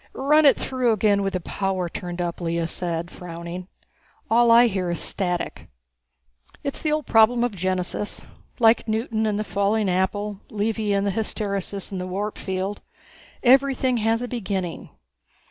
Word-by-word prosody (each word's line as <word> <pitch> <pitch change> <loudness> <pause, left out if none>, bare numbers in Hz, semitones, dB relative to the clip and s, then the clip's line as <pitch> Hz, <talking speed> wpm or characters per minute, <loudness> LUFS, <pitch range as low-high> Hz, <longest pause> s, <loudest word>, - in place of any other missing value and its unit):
"Run 295 +3 +4
it 275 - +6
through 255 -3 +1
again 205 -1 +2
with 195 -1 -1
the 185 - 0
power 190 0 -2
turned 175 +1 -5
up," 175 0 -3
Lea 170 0 -1
said, 170 0 -3
frowning. 170 +1 -7 0.6
"All 235 +1 +5
I 235 +1 +8
hear 190 -5 -1
is 175 - -2
static." 180 -3 -2 1.0
"It's 280 - -3
the 305 - 0
old 305 -1 0
problem 230 +2 +4
of 245 -4 -1
genesis. 185 +2 -2 0.3
Like 230 -1 +4
Newton 220 0 0
and 210 -1 0
the - - 0
falling 205 +1 0
apple, 200 +2 -1
Levy 215 0 -1
and 200 0 +1
the 200 - +1
hysteresis 200 -2 -2
in 190 - -4
the 180 - -4
warp 205 +3 -3
field. 190 +1 -3 0.6
Everything 260 -1 +4
has 225 +2 +1
a - - -3
beginning. 195 -8 -4
205 Hz, 160 wpm, -24 LUFS, 185-230 Hz, 1.0 s, I